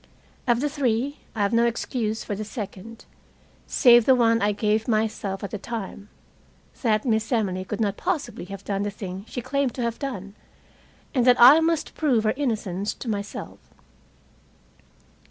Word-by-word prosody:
Of 240 0 +3
the 295 - +1
three, 275 -1 -1 0.2
I 210 - 0
have 200 - 0
no 230 +1 +4
excuse 225 -1 -2
for 210 - -4
the 210 +2 -4
second, 215 0 -8 0.6
save 240 -3 +6
the 260 - +7
one 230 -2 +3
I 205 +1 +2
gave 210 +1 0
myself 215 -3 -1
at 200 - -5
the 210 - -4
time 210 -2 -6 0.7
that 215 -2 +1
Miss 220 -1 0
Emily 195 -6 0
could 200 +2 -5
not 205 -3 0
possibly 290 - -3
have 195 +1 -9
done 200 -1 -1
the 205 - -1
thing 195 -1 -7
she 245 - -5
claimed 275 -1 -1
to 250 - -2
have 235 -1 -2
done, 205 -8 -5 0.8
and 255 -4 +2
that 250 0 +6
I 260 +6 +9
must 325 -1 0
prove 260 -8 +1
her 215 - +2
innocence 215 -8 -2
to - - -9
myself. 205 -2 -5
225 Hz, 170 wpm, -24 LUFS, 205-245 Hz, 0.8 s, I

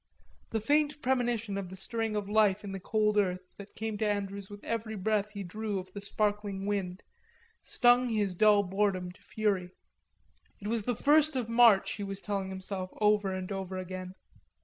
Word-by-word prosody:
The 225 - -1
faint 295 +6 +2
premonition 240 -5 0
of 190 -2 -6
the 190 - -8
stirring 225 +2 -3
of 205 -1 -2
life 210 -1 +3
in 200 - -6
the 195 - -5
cold 210 +2 +2
earth, 185 -2 0 0.2
that 200 0 -11
came 220 -1 -4
to 215 -1 +1
Andrews 200 -1 -3
with 205 0 -10
every 225 -1 -3
breath 210 +1 0
he 200 -1 -6
drew 210 +3 -3
of 185 0 -7
the 200 - -6
sparkling 205 -1 -1
wind, 195 -2 -2 0.6
stung 245 +1 +4
his 210 -4 0
dull 205 +2 +5
boredom 190 -1 0
to - - -20
fury. 200 -4 -1 0.9
It 205 - -6
was 230 0 +1
the 245 - 0
first 305 +4 +4
of 245 -3 -2
March, 230 -4 +6
he 205 - -4
was 195 -1 -5
telling 200 -1 -3
himself 190 0 -5
over 210 -2 +3
and 185 +1 -4
over 190 -1 -4
again. 185 0 -6
205 Hz, 185 wpm, -30 LUFS, 190-220 Hz, 0.9 s, March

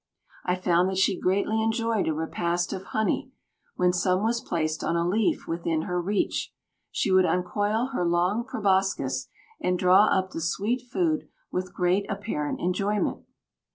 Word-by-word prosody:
I 180 - +1
found 180 0 +2
that 190 - -3
she 190 +1 +3
greatly 200 +4 +1
enjoyed 225 -1 0
a 160 - +1
repast 170 +2 -1
of 190 0 -6
honey; 220 +7 -1 0.5
when 180 0 +2
some 185 +2 +1
was 230 +1 +1
placed 155 -2 -2
on 170 - 0
a 170 0 +1
leaf 210 +3 +1
within 165 -1 -1
her 180 0 -1
reach, 200 +3 -1 0.4
she 195 - -1
would 185 0 +6
uncoil 205 +7 0
her 180 - 0
long 175 +6 +1
proboscis 190 - 0 0.3
and 180 0 +1
draw 185 +3 +6
up 185 0 +1
the 165 - -5
sweet 205 +9 -1
food 315 0 0 0.2
with 185 0 -3
great 180 +3 +1
apparent 200 -8 -3
enjoyment. 200 +4 -1
185 Hz, 155 wpm, -26 LUFS, 175-210 Hz, 0.5 s, would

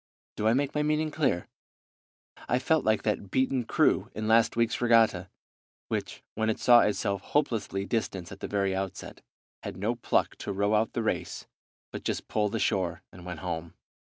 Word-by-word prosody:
Do 105 - 0
I 110 - +5
make 140 +1 0
my 150 - 0
meaning 155 +1 0
clear? 140 - 0 1.0
I 125 - +3
felt 155 +5 +2
like 110 0 +2
that 105 -2 -1
beaten 130 +1 +1
crew - - +2
in 110 0 -3
last 115 +1 +4
week's 115 0 +1
regatta, 115 -6 +3 0.6
which, - - -4
when 110 0 0
it 110 - 0
saw 120 -1 +7
itself 100 -3 0
hopelessly 115 -8 -1
distanced 100 -6 -3
at 95 - -9
the - - -4
very 100 -2 0
outset, 95 -1 -5 0.4
had 85 - -6
no 105 +5 0
pluck 120 - 0
to - - -5
row 100 +2 +1
out 110 +1 +2
the 115 - -1
race, 110 - -2 0.5
but - - -7
just - - -3
pulled 105 0 0
ashore 90 -6 0
and 90 0 -12
went 90 -3 -6
home. 85 -1 -5
110 Hz, 180 wpm, -28 LUFS, 95-120 Hz, 1.0 s, saw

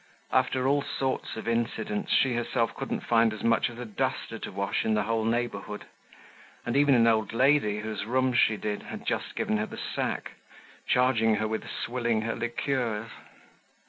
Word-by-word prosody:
After 130 0 +2
all 140 +1 +3
sorts 135 -2 -2
of 110 - -6
incidents, 115 -2 -1
she 130 -2 +4
herself 120 0 0
couldn't 135 - -3
find 115 -1 +3
as 110 - -8
much 115 +1 +3
as 120 - -11
a 125 - -5
duster 105 -3 -3
to - - -6
wash 100 +1 -1
in 110 -1 +1
the 105 - +2
whole 110 +1 0
neighborhood; 115 -3 -2 0.8
and - - -1
even 140 -1 +5
an 115 -1 +5
old 110 -2 +2
lady, 125 -4 +3
whose 110 -1 -4
rooms 130 +1 +2
she 110 - +4
did, 105 0 -3
had - - -8
just - - -2
given 110 - 0
her 105 +1 -1
the - - -9
sack, - - -3 0.6
charging 115 -3 +3
her 110 +1 0
with 110 0 -4
swilling 120 -3 -1
her 115 - -1
liqueurs. 120 -2 -2
115 Hz, 175 wpm, -28 LUFS, 110-125 Hz, 0.8 s, even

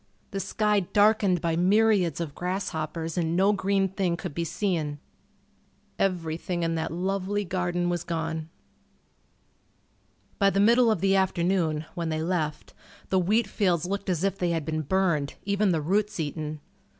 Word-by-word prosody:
The 195 - -3
sky 210 +1 +1
darkened 205 -1 +3
by 165 -1 0
myriads 190 -2 +3
of 160 -4 -4
grasshoppers 170 -2 -3
and 165 0 0
no 195 +3 +4
green 195 0 +1
thing 185 -2 -1
could - - -6
be 170 - -2
seen. 165 -4 -1 1.0
Everything 175 -1 -1
in 165 0 0
that 160 -1 -2
lovely 195 +3 -1
garden 175 -1 -1
was 175 -1 -1
gone. 160 -2 -3 1.9
By 200 -1 +5
the 195 - 0
middle 235 +3 +5
of 215 -6 +1
the 195 0 +3
afternoon, 175 -4 +1
when 170 -2 -3
they 155 0 -1
left, 160 -4 -2 0.4
the 190 - +3
wheat 210 +6 +2
fields 180 -5 0
looked 200 +2 -3
as 175 -1 0
if 195 0 0
they 180 - +1
had 165 -3 -1
been 155 0 -1
burned, 155 -3 0
even 200 0 +2
the 160 -3 +1
roots 205 +5 0
eaten. 155 0 -4
180 Hz, 155 wpm, -27 LUFS, 165-195 Hz, 1.9 s, By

